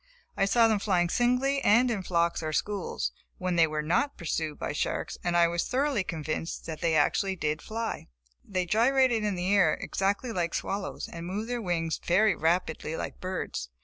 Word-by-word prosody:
I 195 - +2
saw 225 +4 +4
them 215 -2 +2
flying 180 -4 +1
singly 250 +6 +2
and 240 +4 +5
in 210 -4 -1
flocks 170 -2 0
or 155 -1 -3
schools, 155 - -2 0.3
when 185 -1 -1
they 165 -1 +5
were 155 0 -2
not 175 - +1
pursued 160 -2 -2
by - - -3
sharks - - -2
and 175 0 +1
I 170 0 +6
was 170 0 -1
thoroughly 270 -5 +1
convinced 160 -1 -4
that 160 -2 -6
they 165 -1 +2
did - - +4
actually 180 -7 +1
fly. 225 +6 -4 0.4
They 185 -2 -2
gyrated 240 +3 +3
in 205 -2 0
the 180 +2 0
air 180 -6 +4
exactly 200 +5 -1
like 175 -5 -1
swallows, 195 0 -3
and 170 0 -7
moved 210 +6 -3
their 245 -1 -1
wings 165 -4 -1
very 205 +5 +4
rapidly 160 -1 0
like - - -6
birds. 185 - -4
185 Hz, 185 wpm, -28 LUFS, 165-220 Hz, 0.4 s, I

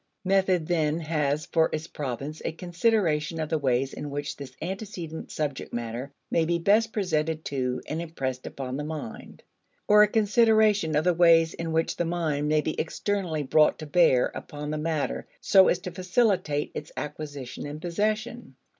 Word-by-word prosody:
Method 190 -3 +2
then 160 -2 +1
has 150 -2 0
for 160 -1 +2
its 155 0 -3
province 145 0 -5
a - - -1
consideration 170 -3 0
of 155 -1 -2
the 160 - 0
ways 130 -1 0
in 150 - -6
which 145 +1 -4
this 140 -2 -9
antecedent 180 -2 -6
subject 145 -4 -3
matter 120 +3 -4 0.2
may 165 - +3
be 170 +1 +1
best 215 +6 +3
presented 160 -6 -1
to 125 -2 -1
and 160 +2 -3
impressed 130 -6 -4
upon 130 -1 -5
the 150 - -3
mind; 150 -6 -7 0.4
or, 210 0 +7
a 210 - +7
consideration 215 -5 +3
of 150 - +3
the 180 +1 +3
ways 165 -1 +5
in 165 -1 -4
which 160 0 0
the - - +1
mind 160 -4 -1
may 155 0 +3
be 155 - -2
externally 175 -2 -2
brought 150 +3 +4
to 155 - -7
bear 150 -5 +4
upon 150 0 -6
the 155 - -2
matter 155 -2 -2
so 190 -1 +6
as - - +3
to 180 0 -7
facilitate 180 -5 +1
its 150 - -7
acquisition 145 -3 -6
and 145 +1 -6
possession. 215 - -2
160 Hz, 170 wpm, -27 LUFS, 150-180 Hz, 0.4 s, or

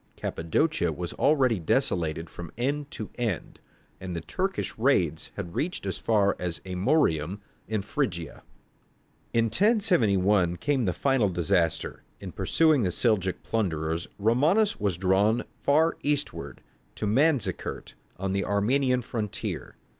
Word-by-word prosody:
Cappadocia 85 - 0
was 85 +2 -5
already 130 -8 +3
desolated 80 0 0
from 85 -1 -9
end 140 +4 -1
to 110 - -6
end, 110 -8 -3 0.4
and 90 -2 -5
the 85 - -3
Turkish 190 - -3
raids 95 - +1
had 85 - -6
reached 170 - -2
as 95 - -3
far 105 -3 +2
as 90 -2 -3
Amorium, 95 - +1 0.3
in 110 -2 -1
Phrygia. 95 - -3 0.9
In 115 0 +2
1071 110 - +3
came 135 +4 0
the 90 - +2
final 135 -4 +2
disaster. 85 -1 0 0.2
In 95 -2 -7
pursuing 140 - +3
the 95 - +1
Seljouk 95 -1 0
plunderers, 80 -6 -1
Romanus 150 - +2
was 100 -5 0
drawn 100 +5 +2 0.2
far 160 +3 +3
eastward, 145 0 -2 0.3
to - - -3
Manzikert, 135 +5 0 0.2
on 95 +1 -2
the 100 0 0
Armenian 125 +5 +1
frontier. 110 -4 -4
105 Hz, 125 wpm, -27 LUFS, 90-135 Hz, 0.9 s, already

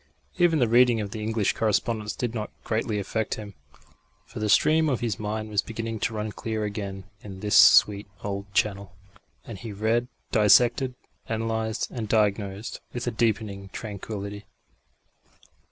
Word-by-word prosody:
Even 175 -2 +4
the 125 -5 +3
reading 120 0 +5
of 100 -2 -4
the 110 -1 -5
English 110 -1 0
correspondence 110 0 0
did 120 -3 -3
not 110 -2 -4
greatly 110 -1 -1
affect 110 +2 -2
him, 105 -2 -9 0.7
for 115 - -9
the 105 0 -1
stream 155 +8 +4
of 130 - 0
his 115 -5 -2
mind 110 +1 -3
was 105 - +2
beginning 115 0 -5
to 110 - -1
run 105 0 -3
clear 110 0 -3
again 100 -2 -4 0.2
in 95 -2 -9
this 105 -1 0
sweet 105 0 +7 0.2
old 100 0 -4
channel; 100 -1 -1 0.5
and 110 -5 -8
he 115 0 -7
read, 110 +4 0 0.2
dissected, 120 +4 +4 0.3
analysed 110 0 -2
and 110 -4 -5
diagnosed 105 -1 0
with 120 0 -4
a 120 - 0
deepening 105 -3 -1
tranquillity. 100 0 -6
110 Hz, 155 wpm, -26 LUFS, 100-115 Hz, 0.7 s, sweet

